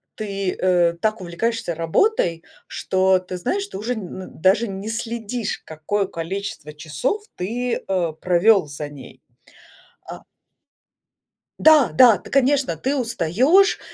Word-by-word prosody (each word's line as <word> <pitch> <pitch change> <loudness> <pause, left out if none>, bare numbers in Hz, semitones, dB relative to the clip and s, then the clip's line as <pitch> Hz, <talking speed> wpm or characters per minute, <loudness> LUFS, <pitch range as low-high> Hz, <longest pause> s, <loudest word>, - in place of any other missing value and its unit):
ты, 195 -3 -3
э, 175 -2 +2
так 215 +6 -2
увлекаешься 180 +1 -3
работой, 165 - 0 0.2
что 190 0 +1
ты 185 0 -8
знаешь, 380 - -2
ты - - -8
уже 230 +5 -3
н 190 -3 -8
даже 200 +6 +3
н 195 -1 -6
не 200 - -7
следишь, 230 0 -4
какое 170 +6 -2
количество 170 -3 -6
часов 155 - -3
ты, 240 +7 -3
э, 180 -4 -1
провел 185 0 +3
за 145 +1 -6
ней. 135 -3 -13 0.9
А - - -8 1.4
Да-да, 260 -7 +6
ты, - - -14
конечно, 275 - +2
ты 265 - -2
устаешь 255 - +2
195 Hz, 125 wpm, -21 LUFS, 170-240 Hz, 1.4 s, Да-да